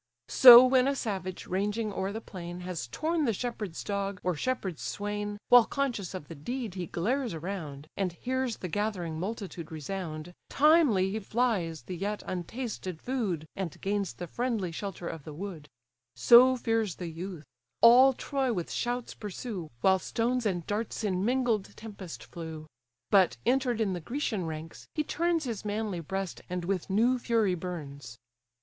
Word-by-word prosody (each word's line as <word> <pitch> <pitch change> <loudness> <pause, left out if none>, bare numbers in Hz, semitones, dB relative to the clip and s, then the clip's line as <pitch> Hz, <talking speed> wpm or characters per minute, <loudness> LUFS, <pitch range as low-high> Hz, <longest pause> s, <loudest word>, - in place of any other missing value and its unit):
So 245 -1 +11
when 255 0 +4
a 280 - +1
savage, 190 -7 -4
ranging 205 +3 -1
o'er 190 +1 -2
the 220 - -4
plain, 175 -3 -8
Has 180 -7 -4
torn 315 - -1
the 230 - +2
shepherd's 215 -7 -4
dog, 200 -2 -2
or 180 - +1
shepherd's 190 -2 -2
swain, 205 0 -3
While 245 -2 +8
conscious 240 -10 -2
of 150 -6 -7
the - - -8
deed, 230 - -5
he 180 -3 -4
glares 235 - -1
around, 155 -4 -6
And 190 -2 -1
hears 255 +6 -2
the 180 - -5
gathering 180 -4 -2
multitude 190 -4 -5
resound, 160 +1 -5 0.2
Timely 280 - +4
he 220 - -2
flies 195 - -1
the 180 - -6
yet 205 +4 -3
untasted 185 -1 -5
food, 205 - -2
And 185 -6 -4
gains 200 -2 -1
the 175 - -6
friendly 220 -1 -2
shelter 180 0 -5
of 160 - -6
the 150 0 -9
wood: 165 -5 -7 0.5
So 255 +2 +7
fears 225 -6 0
the 180 - -6
youth; 170 0 -6 0.4
all 255 +3 +8
Troy 270 0 -1
with 180 -7 -3
shouts 245 0 -2
pursue, 205 -4 -6
While 190 0 +4
stones 235 +3 0
and 175 -4 -2
darts 220 +2 -3
in 190 -3 0
mingled 235 -3 0
tempest 200 -6 -8
flew; 160 -2 -8 0.5
But 190 -3 +5
enter'd 250 -1 +2
in 205 -4 +1
the 175 - -3
Grecian 220 - -2
ranks, 160 0 -7
he 305 - +1
turns 335 +2 0
His 230 -6 -4
manly 210 -3 -2
breast, 190 +3 -4
and 180 -1 -3
with 190 -1 -2
new 235 +6 +3
fury 225 -5 +2
burns. 145 -9 -6
200 Hz, 165 wpm, -29 LUFS, 175-235 Hz, 0.5 s, So